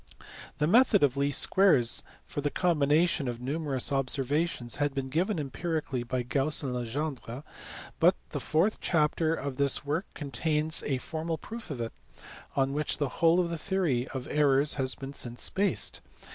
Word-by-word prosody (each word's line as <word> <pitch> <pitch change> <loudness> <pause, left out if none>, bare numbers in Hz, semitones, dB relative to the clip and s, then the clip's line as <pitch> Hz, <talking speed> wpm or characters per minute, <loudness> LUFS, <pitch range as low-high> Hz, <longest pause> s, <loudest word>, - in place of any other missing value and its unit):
The 150 - +1
method 210 - +5
of 140 -2 +3
least 140 0 +3
squares 180 -12 +4 0.2
for 145 - -5
the 145 - 0
combination 155 -2 +2
of 120 -1 -4
numerous 140 0 -2
observations 135 -1 -1
had 145 -1 -1
been 135 -1 -3
given 180 +8 0
empirically 150 -1 -3
by 125 +1 -2
Gauss 135 +5 +2
and 130 -2 -2
Legendre, 125 +1 -4 0.6
but - - +5
the - - -4
fourth 175 +8 +1
chapter 160 0 +1
of 140 -3 -5
this 140 0 +2
work 155 +7 -2
contains 150 +3 0
a 135 -2 0
formal 160 +4 -4
proof 225 +5 -9
of 140 -5 -5
it; 115 -1 -4 0.6
on 135 0 +1
which 150 +1 -1
the 145 -3 -1
whole 165 +5 +3
of 170 -2 0
the 165 - -4
theory 160 -10 0
of 130 0 -6
errors 145 -1 +3
has 130 -2 -1
been 135 0 -8
since 120 -4 -2
based. 200 +1 +1
145 Hz, 165 wpm, -29 LUFS, 130-165 Hz, 0.6 s, method